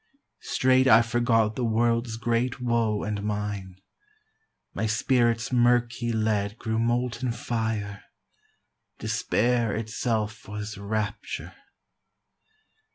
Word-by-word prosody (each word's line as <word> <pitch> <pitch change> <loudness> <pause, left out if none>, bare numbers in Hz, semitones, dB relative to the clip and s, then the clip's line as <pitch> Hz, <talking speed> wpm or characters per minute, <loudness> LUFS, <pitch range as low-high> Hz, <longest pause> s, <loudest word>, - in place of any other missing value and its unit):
Straight 130 0 +4
I 115 -1 +7
forgot 115 -2 +2
the 125 - -2
world's 115 0 +1
great 120 +3 0
woe 115 -4 0
and 105 0 -2
mine; 105 -3 -3 1.0
My 110 - -1
spirit's 115 +2 +1
murky 120 -1 +2
lead 110 -1 0
grew 110 -1 -2
molten 120 +1 0
fire; 110 -4 -3 0.9
Despair 120 -2 0
itself 110 -1 -2
was 105 +1 -5
rapture. 100 0 -4
115 Hz, 95 wpm, -26 LUFS, 105-120 Hz, 1.0 s, I